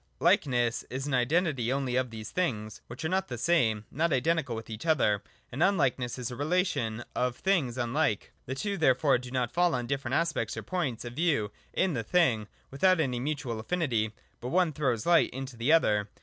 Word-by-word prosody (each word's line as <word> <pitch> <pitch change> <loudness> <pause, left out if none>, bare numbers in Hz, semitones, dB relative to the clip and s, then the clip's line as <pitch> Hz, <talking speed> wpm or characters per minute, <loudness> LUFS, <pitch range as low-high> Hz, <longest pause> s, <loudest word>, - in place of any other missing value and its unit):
118.] - - -6 0.3
Likeness 120 -1 +1
is 130 +2 -4
an 145 - -3
Identity 130 -1 +1
only 135 -2 -1
of 130 -1 +1
those 110 -2 -8
things 110 - -2
which 120 +6 -7
are - - 0
not 190 +1 0
the 120 - -5
same, 115 -8 +2
not 165 +4 0
identical 140 -1 +1
with 110 - -7
each 110 +8 -7
other: 105 -10 +3 0.3
and 135 - -4
UnlilserLess 135 -10 +2
is 125 0 -4
a - - -5
relation 145 - 0
of 125 -1 0
things 155 -11 0
unlike. 120 -2 0 0.2
The 130 - -3
two 200 +7 -2
therefore 140 -3 +3
do 125 0 -9
not 125 -2 -1
fall 175 -2 +3
on 125 -1 -2
different 135 0 -2
aspects 170 -1 0
or - - -4
points 145 -11 -2
of 120 - -6
view 140 -9 +1 0.2
in 185 -3 +1
the 120 - -1
thing, 115 - +2 0.2
without 185 +6 +3
any 130 -6 0
mutual 135 -4 -3
affinity: 115 -6 0 0.3
but 120 - -6
one 175 +1 +2
throws 130 -6 -1
light 170 -1 +5
into 135 -1 -6
the 120 +6 +1
other. 105 -10 +3
130 Hz, 200 wpm, -29 LUFS, 120-165 Hz, 0.3 s, light